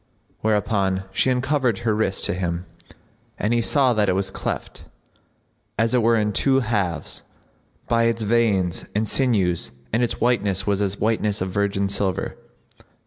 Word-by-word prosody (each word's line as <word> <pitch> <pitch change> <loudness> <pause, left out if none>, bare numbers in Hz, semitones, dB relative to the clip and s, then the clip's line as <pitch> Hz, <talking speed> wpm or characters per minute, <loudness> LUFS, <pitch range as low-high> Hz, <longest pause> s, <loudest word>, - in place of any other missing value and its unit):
Whereupon 100 -3 0
she 115 - +1
uncovered 130 -2 +1
her 110 -2 +2
wrist[FN#60] 105 -3 -1
to - - 0
him, 90 -1 -3 0.7
and 105 +3 0
he 120 - +2
saw 130 +1 +3
that 105 -3 +1
it - - +3
was 95 0 -1
cleft, - - -5 0.9
as 115 +3 +1
it 125 - +3
were 115 +1 +3
in 105 -2 0
two 135 +5 +3
halves, 100 - -2 0.7
by 115 0 +2
its 115 -1 0
veins 105 -5 +1
and 110 +1 +1
sinews 100 -10 +1 0.2
and 115 - +2
its 120 - -1
whiteness 105 -6 +1
was 100 -1 0
as 100 -1 0
the - - -18
whiteness 105 -2 +1
of 95 0 -3
virgin 100 0 0
silver. 100 -2 -1
105 Hz, 160 wpm, -22 LUFS, 95-115 Hz, 0.9 s, saw